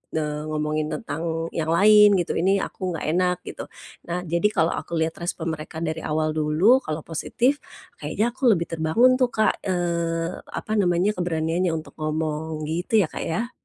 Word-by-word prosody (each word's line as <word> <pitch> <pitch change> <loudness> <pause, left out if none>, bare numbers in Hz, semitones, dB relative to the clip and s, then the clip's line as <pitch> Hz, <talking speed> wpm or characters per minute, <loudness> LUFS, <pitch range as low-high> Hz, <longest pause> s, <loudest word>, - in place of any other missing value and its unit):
eee, 150 -1 -2
ngomongin 155 0 -1
tentang 165 -2 -3
yang 160 -2 -2
lain 205 +4 +6
gitu, 175 -3 0
ini 195 +3 +2
aku 185 -2 -4
nggak 160 - -5
enak, 180 0 +1
gitu. - - -7 0.4
Nah, 175 +1 -3
jadi 170 +4 +1
kalau 170 -6 +1
aku 170 - -4
lihat 160 0 -1
respon 170 -1 -3
mereka 160 +1 -6
dari 160 0 -2
awal 155 0 -1
dulu, 155 +11 +4
kalau 155 - -5
positif 250 - 0 0.4
kayaknya 230 +3 -1
aku 260 +1 0
lebih 170 0 -4
terbangun 195 +11 +3
tuh 255 - +4
Kak, 220 -2 +1
eee, 170 -1 -1
apa - - -6
namanya, 180 +2 +2
keberaniannya 170 -1 -1
untuk 155 - -6
ngomong. 155 0 -2
Gitu 175 +7 +1
ya, 155 - -5
Kak, - - -5
ya? 230 +9 -2
170 Hz, 170 wpm, -24 LUFS, 160-185 Hz, 0.4 s, lain